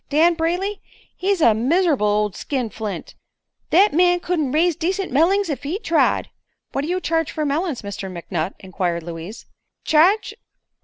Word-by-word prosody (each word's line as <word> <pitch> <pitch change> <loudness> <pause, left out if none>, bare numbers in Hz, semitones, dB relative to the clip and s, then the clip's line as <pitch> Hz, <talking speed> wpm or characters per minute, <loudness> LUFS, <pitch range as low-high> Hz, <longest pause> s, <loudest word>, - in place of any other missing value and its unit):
"Dan 320 +4 +4
Brayley, 355 +5 -2 0.3
he's 385 -1 0
a 230 - +6
miser'ble 290 - +2
ol' 210 0 +2
skinflint. 220 -3 -4 0.6
Thet 390 +3 +5
man 355 +2 +4
couldn't 330 -7 -1
raise 330 +3 +2
decent 365 +4 -2
mellings 360 +8 +3
ef 290 -4 -3
he 300 +7 -3
tried." 340 -7 +1 0.4
"What 275 - -1
do 290 - -4
you 360 +2 0
charge 325 -3 0
for 310 - -2
melons, 295 -2 -1
Mr. 200 -1 -6
McNutt?" 170 0 -4
inquired 180 -3 -3
Louise. 170 +6 -8 0.4
"Charge? 350 +8 +3
310 Hz, 150 wpm, -21 LUFS, 215-355 Hz, 0.6 s, a